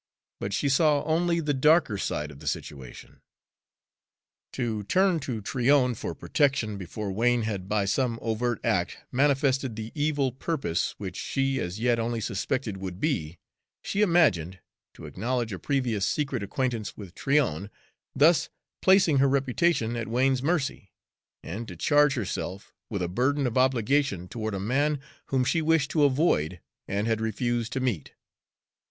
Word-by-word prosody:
But 100 - -3
she 140 - 0
saw 145 +1 +3
only 170 +2 +1
the 150 -2 0
darker 150 -3 +4
side 75 -6 -3
of 70 - -13
the - - -10
situation. 65 -4 -6 1.3
To 115 -4 -2
turn 185 - +3
to 125 -6 -4
Tryon 125 +3 +2
for - - -5
protection 120 -8 0
before 100 +3 -5
Wain 120 +3 +2
had 100 -3 -4
by 105 -2 +1
some 120 +3 0
overt 115 0 -1
act - - 0
manifested 135 -2 +2
the 110 0 -6
evil 145 -3 0
purpose 135 - -2
which - - -6
she 135 0 -1
as 90 +4 -4
yet 120 0 +2
only 115 0 -1
suspected 110 +1 -2
would 95 -1 -6
be, 90 - -1 0.5
she 200 - -1
imagined, 145 - +3 0.4
to - - -10
acknowledge 120 -2 -2
a 95 - -5
previous 125 -8 -1
secret 135 -3 -1
acquaintance 115 +1 -2
with 95 -5 -9
Tryon, 125 - 0 0.5
thus 160 +3 +4 0.3
placing 185 -7 +5
her 140 0 +4
reputation 135 -2 +1
at 115 -1 -3
Wain's 130 +3 +2
mercy, 140 - -1 0.5
and 110 +7 -6
to - - -8
charge 145 -1 +3
herself 100 -3 -4 0.2
with 100 -5 -2
a - - 0
burden 130 +9 +1
of 120 - -1
obligation 130 -5 +2
toward 110 0 -4
a - - -3
man 140 +8 +1 0.3
whom 130 -2 +1
she 160 +5 +1
wished 160 -2 +2
to 150 -3 +4
avoid 130 - +1 0.3
and 100 +2 -1
had 110 -1 0
refused 115 +1 -1
to 135 - -1
meet. 120 - -2
125 Hz, 155 wpm, -27 LUFS, 105-145 Hz, 1.3 s, placing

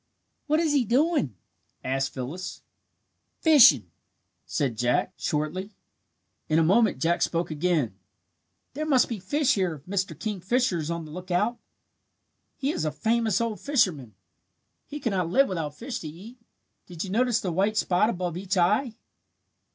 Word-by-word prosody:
"What 305 +1 +2
is 320 -3 +1
he 280 -3 +3
doing?" 250 - +1 0.5
asked 135 +1 -1
Phyllis. 150 +8 -6 0.8
"Fishing," 170 - +6 0.6
said 135 -5 -1
Jack, 120 +2 0
shortly. 175 +7 -3 0.7
In 155 - +3
a 165 - +4
moment 210 - +3
Jack 165 +6 0
spoke 170 -1 0
again. 155 - 0 0.8
"There 305 +3 -3
must 265 -5 +4
be 230 -4 -4
fish 285 +9 +1
here 185 -5 0
if 145 0 -15
Mr. 190 0 -2
Kingfisher 210 0 0
is 155 0 -4
on 170 -1 -3
the 155 - -11
lookout. 185 +7 -1 1.0
He 280 +1 -1
is - - -3
a 155 - 0
famous 220 +6 +1
old 230 -2 -2
fisherman. 165 - 0 0.7
He 295 - -6
could 235 - -1
not 180 -3 -1
live 270 +8 +4
without 160 -6 -4
fish 240 - -5
to 160 - -7
eat. 200 +11 -11 0.5
Did 175 -2 -6
you 190 - -6
notice 240 +1 +2
the 185 - -3
white 200 +5 +1
spot 185 +2 +2
above 180 -5 -3
each 190 +1 -2
eye?" 215 +7 +2
185 Hz, 155 wpm, -26 LUFS, 160-235 Hz, 1.0 s, Fishing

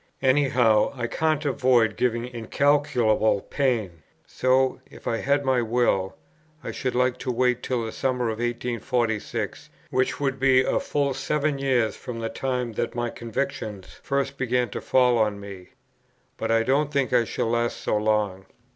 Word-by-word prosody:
Any 135 +1 +3
how, 110 -4 +3
I 120 -3 -3
can't 155 +4 0
avoid 125 -5 +3
giving 120 -1 0
incalculable 120 -3 +2
pain. 110 - -1 0.2
So, 130 +1 +1
if - - -12
I 115 - 0
had 140 +3 +1
my 130 -2 +2
will, 115 -5 +1 0.5
I - - -4
should 130 -2 -3
like 125 0 +1
to 130 - -2
wait 125 0 +1
till 120 -3 -2
the 110 - -5
summer 125 0 -1
of 110 0 -4
1846, 120 -1 -2 0.2
which 130 0 0
would 135 -2 -1
be 130 -1 +5
a - - +1
full 140 -2 -1
seven 140 +2 -1
years 130 -5 +1
from 120 -3 -7
the 115 0 -3
time 125 -3 -2
that - - -3
my 120 -1 -2
convictions 115 -5 -5
first 140 0 -2
began 125 -2 +1
to - - -5
fall 125 -2 +3
on 105 -2 +1
me. 100 -3 -10 0.7
But 115 - -4
I 115 0 +3
don't 140 +4 +1
think 140 -3 0
I 120 -1 +5
shall 115 0 -2
last 120 0 0
so - - -1
long. 105 -3 0
125 Hz, 165 wpm, -25 LUFS, 115-135 Hz, 0.7 s, be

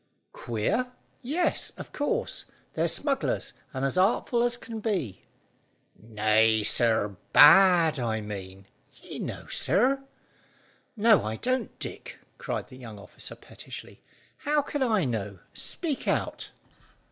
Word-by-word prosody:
"Queer? 120 - -1 0.3
Yes, 300 +8 -1
of - - -9
course. 455 +12 -2 0.3
They're - - +1
smugglers, 275 -2 -1 0.2
and 135 0 -2
as 135 +7 0
artful 235 +4 +2
as 240 0 +1
can 230 -2 -7
be." 180 - -3 0.7
"Nay, 110 0 +2
sir, 105 -3 +2 0.2
bad, 165 -1 +7
I 115 -2 -1
mean 95 -2 -8 0.4
you - - -8
know, - - -5
sir." 270 +5 +2 1.0
"No, 215 -1 +5
I 110 +1 -3
don't, 255 - -2
Dick," - - -7 0.2
cried - - -4
the 130 - -12
young 115 -5 -10
officer 100 - -9
pettishly. - - -11 0.4
"How 295 0 +1
can 290 0 -4
I 220 - +2
know? 105 -5 -3 0.2
Speak 310 -6 -3
out." - - -1
160 Hz, 125 wpm, -27 LUFS, -, 1.0 s, bad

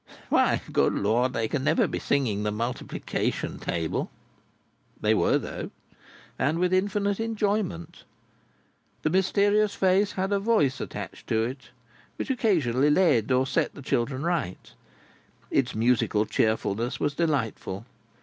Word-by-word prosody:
Why, - - +3
good - - +2
Lord, 120 +5 +1
they 115 -1 0
can 135 +3 -2
never 155 +3 +3
be - - -3
singing 120 -8 0
the 105 - 0
multiplication 115 +4 -3
table!" 85 -2 -2 0.9
They - - +2
were - - +3
though, - - -5 0.7
and 145 +5 +1
with 180 +1 +1
infinite 200 +1 +1
enjoyment. 210 - -2 1.0
The 155 - +1
mysterious 205 +3 +2
face 195 +2 +2
had 190 +1 -2
a 200 - +2
voice 195 - +2
attached - - -7
to 110 0 +1
it 130 +3 -6 0.5
which - - -3
occasionally 150 - +2
led 150 - +3
or 130 +1 +3
set 135 - -1
the 140 - -10
children 130 +3 -1
right. 165 - -2 0.8
Its 125 -2 +1
musical 110 -2 +2
cheerfulness 110 +2 0
was 145 - 0
delightful. 125 - -2
140 Hz, 130 wpm, -26 LUFS, 115-190 Hz, 1.0 s, Why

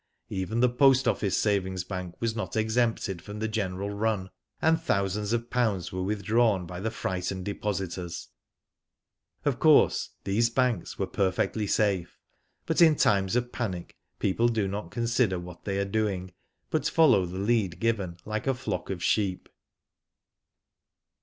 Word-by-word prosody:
Even 95 +5 -2
the 125 - +6
Post 135 +1 +4
Office 100 -2 +1
Savings 95 -3 0
Bank 90 -2 -6
was 115 -1 -1
not 110 - -4
exempted 110 -4 0
from 105 +3 -8
the 110 +1 -1
general 100 -2 -2
run, 100 -2 -1 0.3
and 160 0 +3
thousands 100 - 0
of 120 0 -1
pounds 110 -8 0
were 95 - -3
withdrawn 105 0 +1
by 90 +1 -7
the 110 +4 -1
frightened 95 -3 -3
de 100 - -2
positors. 95 -4 -4 1.2
Of - - +1
course, - - +5
these 115 +4 +2
banks 125 -1 0
were - - 0
perfectly 100 +2 0
safe; 95 -6 0 0.5
but - - +1
in 160 -2 +7
times 100 -4 +2
of 120 0 0
panic, 95 -8 -4 0.2
people 115 +5 +2
do 110 -4 0
not 95 -3 -4
con 115 +6 -2
sider 115 -5 +2
what 90 0 -9
they 100 -1 -1
are 100 - 0
doing, 95 -3 -2 0.4
but - - +1
follow 125 - +4
the 90 +2 -6
lead 100 -4 0
given, 100 -7 -1
like 110 +3 -3
a 135 - +2
flock 130 - -4
of 90 -3 -4
sheep. 100 -2 0
100 Hz, 155 wpm, -28 LUFS, 95-115 Hz, 1.2 s, in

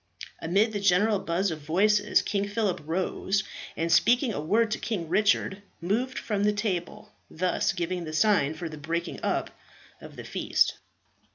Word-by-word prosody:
Amid 200 +7 +2
the 205 - -1
general 200 +2 +3
buzz 180 +2 -1
of 160 - -5
voices 205 +6 +2
King 200 -1 -1
Phillip 205 -2 -1
rose, 190 +3 -1 0.3
and 165 +1 -1
speaking 240 - +4
a 145 - -3
word 215 +8 +2
to - - -1
King 190 -8 -3
Richard, 200 0 +2 0.2
moved 230 +9 -1
from 205 -2 -1
the 210 0 +3
table, 200 -5 -3 0.2
thus 185 +4 0
giving 175 -2 -3
the 155 - -6
sign 160 -5 +3
for 170 +2 -5
the 155 -1 -9
breaking 170 +3 -3
up - - -1 0.5
of - - -11
the - - -8
feast. - - +1
195 Hz, 165 wpm, -27 LUFS, 170-210 Hz, 0.5 s, speaking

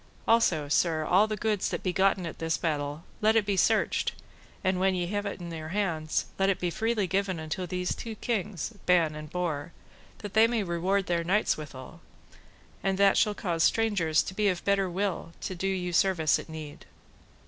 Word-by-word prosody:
Also, 185 -10 +3
sir, 155 +1 +1
all 195 +6 +4
the 215 -1 -3
goods 210 -2 0
that - - -4
be 185 - 0
gotten 190 0 +2
at 165 - -7
this 165 -1 0
battle, 150 -1 -2 0.2
let 215 +1 +4
it 220 -2 +3
be 200 -1 0
searched, - - +2 0.5
and 185 -1 +1
when 190 0 +2
ye 175 -1 -1
have 205 +3 -2
it 200 - -5
in 170 -1 -7
your 160 -1 -6
hands, 165 -4 -1
let 195 0 +3
it 195 - +1
be 175 - 0
given - - -9 0.3
freely 190 -1 -1
unto 175 +4 -4
these 180 0 -2
two 225 -2 -6
kings, 210 -3 -3
Ban 170 -4 +4
and 150 0 -8
Bors, 170 -4 -2 0.5
that 205 -2 -8
they 220 +1 +6
may 230 -2 0
reward 185 +2 0
their 170 -1 0
knights 195 +5 +2
withal; 140 -4 -10 0.8
and 195 0 0
that 200 0 +5
shall 210 -1 +2
cause 170 -5 -1
strangers 195 -9 +2
to - - -6
be 210 +1 +1
of 180 -3 -1
better 195 -1 +2
will 185 -2 -2
to - - -3
do 185 +2 -3
you 180 -2 -2
service 165 -5 +3
at - - -10
need. 155 -2 -9
185 Hz, 200 wpm, -28 LUFS, 165-200 Hz, 0.8 s, they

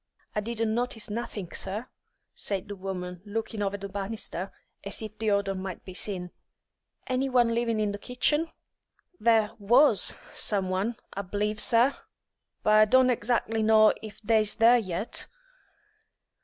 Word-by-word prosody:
"I - - 0
didn't 225 0 -2
notice 235 -3 -2
nothink, 210 -5 -5
sir," 205 +5 -4 0.5
said 200 0 -2
the 205 - -6
woman, 180 -2 -6
looking 220 0 -4
over 200 0 -1
the 200 0 -6
banisters 195 -1 -4 0.3
as 200 - -3
if 215 -1 -7
the 220 -1 0
odour 200 -1 +1
might 190 -1 -6
be 185 - -8
seen. 180 -2 -4 0.7
"Any 260 +1 0
one 240 -2 +3
living 230 -1 0
in 210 -1 +1
the 205 - -6
kitchen?" 295 +8 0 0.7
"There 225 -2 +3
was 235 +3 +4 0.2
some 195 -3 0
one, 200 +6 -1 0.2
I 200 - -3
b'lieve, 210 +2 -2
sir, 240 +5 +4 0.7
but 215 - +3
I 215 0 +7
don't 260 +3 +5
exac'ly 225 -1 0
know 215 0 +6
if 215 -1 -9
they's 215 -1 +3
there 235 +2 +6
yet." 190 0 -2
215 Hz, 150 wpm, -27 LUFS, 200-230 Hz, 0.7 s, I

